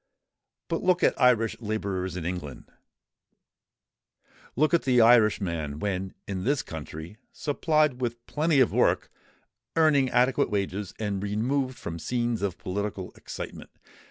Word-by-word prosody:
But 165 - -2
look 180 -1 +2
at - - +2
Irish 115 -3 +4
labourers 100 -4 -3
in 85 - -5
England—look 90 - -8
at 170 - +4
the 125 -2 +3
Irishman 100 -10 +3
when 95 +1 -3
in 95 -2 -3
this 140 +4 +1
country, 80 +4 -8
supplied 150 -3 +1
with 120 -1 -3
plenty 155 -1 +1
of 125 - +3
work, - - +2 0.6
earning 150 -5 +4
adequate 125 +2 +2
wages, 100 -1 -2
and 100 -3 -2
removed 125 +6 -1
from 85 0 -6
scenes 120 +6 -1
of 95 -4 -2
political 100 0 -4
excitement. - - -8
110 Hz, 125 wpm, -27 LUFS, 95-130 Hz, 0.6 s, Irish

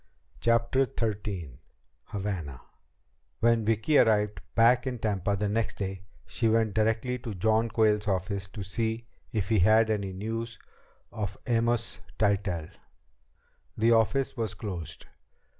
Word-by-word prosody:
CHAPTER 115 +3 +2
XIII 100 - -3 0.4
Havana 95 -10 -4 0.8
When 115 0 +3
Vicki 115 +7 +3
arrived 105 -2 +3
back 120 +2 +5
in 125 -1 -2
Tampa 100 -3 0
the 105 +1 -1
next 110 +2 -1
day, 95 -2 -4 0.2
she 115 -2 0
went 110 -2 +2
directly 115 +4 +1
to 115 -3 -6
John 110 +4 +2
Quayle's 105 -2 +2
office 95 0 -1
to 100 +1 -6
see 110 +4 -2 0.3
if 105 -4 -1
he 110 -2 +3
had 110 +4 +5
any 100 -3 -1
news 115 +4 -4 0.5
of 100 -2 -4
Amos 115 -7 0 0.2
Tytell. 100 -6 0 1.1
The 115 +2 +4
office 115 +5 +2
was 115 -3 -2
closed. 90 -7 -6
110 Hz, 125 wpm, -28 LUFS, 100-115 Hz, 1.1 s, back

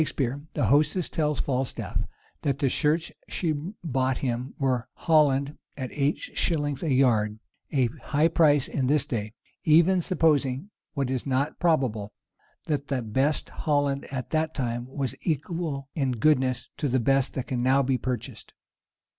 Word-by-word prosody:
In - - +3
Shakspeare, 135 -1 -2
the - - +1
hostess 155 +5 +3
tells 150 -2 0
Falstaff, 130 -1 -2 0.3
that 140 -2 0
the 135 -1 +1
shirts 160 +4 +1 0.2
she 170 -4 0 0.3
bought 130 -4 0
him 125 0 -3
were 130 -3 0
Holland 145 -3 +2 0.2
at 130 -2 -4
eight 145 +1 +1
shillings 145 -4 -1
a 160 - -1
yard; 110 -5 +3 0.3
a 135 -3 +3 0.2
high 150 +2 +2
price 150 -4 +4
at 130 -2 -1
this 145 -1 +3
day, 110 -3 -3 0.3
even 170 +4 +5
supposing, 150 -1 +1 0.2
what 135 -3 -1
is 130 +1 -2
not 135 +3 0
probable, 130 - +1 0.5
that 145 -2 -2
the 130 -4 -1
best 130 +8 0
Holland 145 -2 0
at 130 -2 -4
that 160 0 0
time 120 -2 -2
was 135 -1 -3
equal 155 -3 -2
in 135 -4 0
goodness 130 0 +2
to 145 - -1
the 130 0 +2
best 135 +2 +1
that 130 - -2
can 125 -2 -2
now 135 +2 +4
be 130 -1 +1
purchased. 125 -3 -5
140 Hz, 155 wpm, -26 LUFS, 130-150 Hz, 0.5 s, even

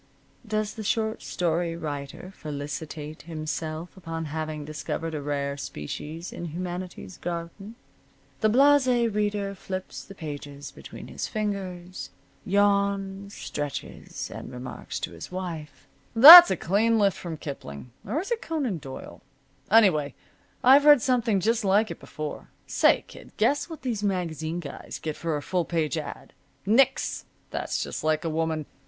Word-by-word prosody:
Does 215 -1 -1
the 220 - -7
short 220 +1 -1
story 170 -1 -1
writer 150 +3 -6
felicitate 150 +1 -6
himself 155 +1 -5
upon 165 -3 -5
having 155 -2 -4
discovered 155 +2 -4
a 150 - -3
rare 140 -1 -2
species 150 - -6
in 175 - -6
humanity's 180 +2 -6
garden? 175 +5 -6 0.6
The 215 - +3
Blase 280 +3 +5
Reader 210 -4 +1
flips 185 -1 -6
the 195 - -12
pages 145 -3 -7
between - - -11
his - - -4
fingers, 190 -4 -4 0.3
yawns, 200 0 +1
stretches, 145 -1 -5
and - - -8
remarks 125 0 -6
to - - -4
his 85 - -9
wife: 165 -6 -6 0.3
"That's 335 +9 +13
a - - 0
clean 220 +6 +2
lift 200 -3 +3
from 165 -3 -6
Kipling 125 - -8
or 230 +11 -2
is 400 - -8
it 470 0 0
Conan 275 - -2
Doyle? 135 -2 -9 0.5
Anyway, 175 - +4 0.5
I've 275 +3 +7
read 290 -6 +8
something 235 -6 +2
just 225 +4 +1
like 205 +2 +3
it - - -7
before. 155 -1 -7 0.2
Say, - - +3
kid, - - -14
guess 290 +4 +2
what 320 -4 -9
these 235 -5 -2
magazine 175 -4 -2
guys 140 -4 -8
get 155 -1 -4
for 165 -3 -2
a 145 - -6
full 180 +3 0
page 160 -2 -1
ad.? 155 -2 -6 0.3
Nix. 265 +6 +2 0.3
That's - - -2
just - - -5
like 155 +1 +1
a 165 - -1
woman. 160 -1 -1
175 Hz, 145 wpm, -26 LUFS, 155-210 Hz, 0.6 s, That's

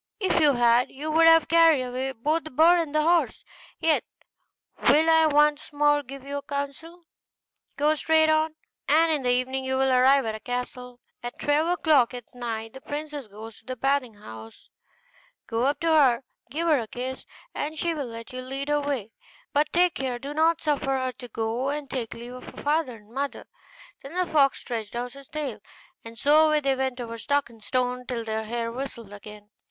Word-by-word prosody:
If 380 -4 +1
you 300 -3 +5
had, 240 0 +3
you 300 +3 -5
would 330 +1 +5
have 325 0 +6
carried 330 -5 +5
away 255 +2 -3
both 300 +8 -1
the 315 - -8
bird 330 +6 +5
and 310 -3 -3
the 305 - +3
horse; 340 +1 +1 0.4
yet 320 -1 +2 0.9
will 310 +3 +5
I 320 -1 +5
once 295 0 +2
more 295 0 +3
give 275 0 -10
you 285 0 -4
counsel. 285 +5 -6 0.7
Go 300 +2 +3
straight 315 +1 +3
on, 315 0 +2 0.3
and 320 +3 +4
in 300 -3 0
the 250 - 0
evening 255 +2 0
you 260 0 -1
will 265 0 +2
arrive 260 +1 +5
at 220 - -2
a 220 - -6
castle. 250 0 -5 0.2
At 240 0 -7
twelve 295 +2 +1
o'clock 310 -8 +3
at 245 -2 -10
night 225 -2 -5
the 265 - -11
princess 295 -3 -6
goes 215 +2 -11
to - - -27
the 255 - -4
bathing 270 -2 0
house: 110 - -12 0.7
go 230 +2 -1
up 285 - 0
to 330 - +1
her 290 -6 +6
and 235 - -13 0.3
give 325 +6 -2
her 305 -4 +4
a 225 - -5
kiss, 255 +3 -6 0.3
and 310 +2 -4
she 340 +1 0
will 290 -5 -4
let 230 +1 -9
you 255 - -5
lead 270 +2 -5
her 295 - +3
away; 280 -7 -3 0.4
but 295 +1 +2
take 355 0 +3
care 260 -2 -3
you 240 - -6
do 280 +3 -6
not 320 +2 +2
suffer 290 -3 0
her 260 0 -2
to 245 - -8
go 230 +4 -2
and 290 -2 -4
take 240 -4 -4
leave 240 +1 -9
of 255 - -10
her - - -10
father 295 -4 0
and 210 0 -18
mother.' 275 +3 -4 0.6
Then 275 +5 -10
the 365 0 +1
fox 285 -5 +2
stretched 225 -4 -5
out 245 +1 -4
his 275 -1 -13
tail, 280 -8 -5 0.4
and 230 0 -11
so 305 +5 +5
away 305 0 +3
they 275 -2 +1
went 260 -1 -2
over 230 -1 -6
stock 285 0 0
and 225 -2 -18
stone 250 +1 -1
till 235 -2 -4
their 220 0 -3
hair 230 +1 -3
whistled 235 -4 -7
again. 210 0 -12
270 Hz, 210 wpm, -25 LUFS, 245-305 Hz, 0.9 s, have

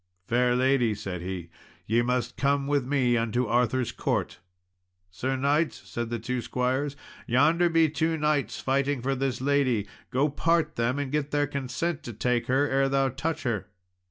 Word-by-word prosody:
"Fair 125 +2 +2
lady," 125 -3 +2
said 95 -4 -5
he, 90 -2 -5 0.3
"ye 115 +3 +2
must 125 0 -1
come 140 0 +1
with 140 -3 0
me 130 -4 +2
unto 115 +2 0
Arthur's 120 +2 +1
court." - - -2 0.7
"Sir 130 +9 -2
knight," 145 +4 +1
said 120 -1 -6
the 120 - -2
two 125 +2 -3
squires, 130 +4 -1 0.3
"yonder 160 +8 +4
be 165 -1 +4
two 160 +1 0
knights 150 -2 0
fighting 140 +1 0
for 135 +1 +1
this 135 -1 -2
lady; 130 -6 +2 0.2
go 135 +3 +2
part 160 +1 +1
them, 120 +3 0
and 140 -2 -3
get 150 -1 -1
their 145 0 +1
consent 140 +3 -3
to 120 - -7
take 120 +2 0
her, 135 +3 +2
ere 135 -1 +2
thou 135 0 +2
touch 155 +6 -3
her." 115 -6 -2
130 Hz, 170 wpm, -27 LUFS, 120-145 Hz, 0.7 s, yonder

